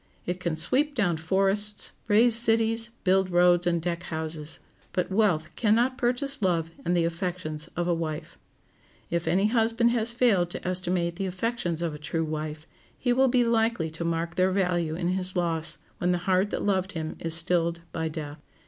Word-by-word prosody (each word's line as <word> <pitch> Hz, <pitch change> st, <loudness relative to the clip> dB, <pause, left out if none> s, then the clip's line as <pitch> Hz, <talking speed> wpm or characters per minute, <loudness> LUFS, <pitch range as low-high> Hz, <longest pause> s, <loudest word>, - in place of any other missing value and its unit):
It 180 Hz, +1 st, -3 dB
can 170 Hz, -3 st, -2 dB
sweep 275 Hz, -, +1 dB
down 175 Hz, -9 st, +1 dB
forests, 195 Hz, +5 st, +2 dB, 0.2 s
raise 225 Hz, +3 st, +4 dB
cities, 225 Hz, 0 st, +4 dB
build 190 Hz, 0 st, +2 dB
roads, 175 Hz, 0 st, +3 dB
and 170 Hz, -1 st, +1 dB
deck 170 Hz, +1 st, -3 dB
houses; 160 Hz, -2 st, -3 dB, 0.3 s
but 180 Hz, +1 st, -2 dB
wealth 190 Hz, -7 st, +1 dB
can 215 Hz, -2 st, +2 dB
not 250 Hz, +3 st, +1 dB
purchase 265 Hz, +1 st, 0 dB
love 165 Hz, -4 st, 0 dB
and 175 Hz, +1 st, 0 dB
the 170 Hz, -, +2 dB
affections 170 Hz, -2 st, -4 dB
of 175 Hz, 0 st, -1 dB
a 175 Hz, -, +2 dB
wife. 155 Hz, -1 st, -5 dB, 0.8 s
If 170 Hz, 0 st, -1 dB
any 195 Hz, +3 st, +2 dB
husband 230 Hz, +1 st, +2 dB
has 235 Hz, -1 st, +1 dB
failed 225 Hz, -8 st, +2 dB
to 175 Hz, -, -6 dB
estimate 175 Hz, -1 st, -1 dB
the 195 Hz, -, -2 dB
affections 180 Hz, -3 st, -2 dB
of 165 Hz, -2 st, -2 dB
a 150 Hz, -, -8 dB
true 165 Hz, +2 st, -2 dB
wife, 155 Hz, 0 st, -5 dB, 0.3 s
he 245 Hz, -1 st, 0 dB
will 265 Hz, +2 st, +3 dB
be 250 Hz, -1 st, +3 dB
likely 225 Hz, -8 st, 0 dB
to 165 Hz, +2 st, -5 dB
mark 170 Hz, 0 st, -2 dB
their 185 Hz, +1 st, +2 dB
value 175 Hz, -4 st, 0 dB
in 175 Hz, +1 st, -2 dB
his 185 Hz, 0 st, -1 dB
loss, 165 Hz, -3 st, 0 dB, 0.2 s
when 180 Hz, -, +1 dB
the -, -, +1 dB
heart 190 Hz, +1 st, +2 dB
that -, -, -3 dB
loved 190 Hz, -1 st, 0 dB
him 160 Hz, -2 st, -5 dB
is 165 Hz, -1 st, +3 dB
stilled 170 Hz, 0 st, +2 dB
by 160 Hz, 0 st, -2 dB
death. 150 Hz, -1 st, -7 dB
180 Hz, 185 wpm, -26 LUFS, 165-215 Hz, 0.8 s, raise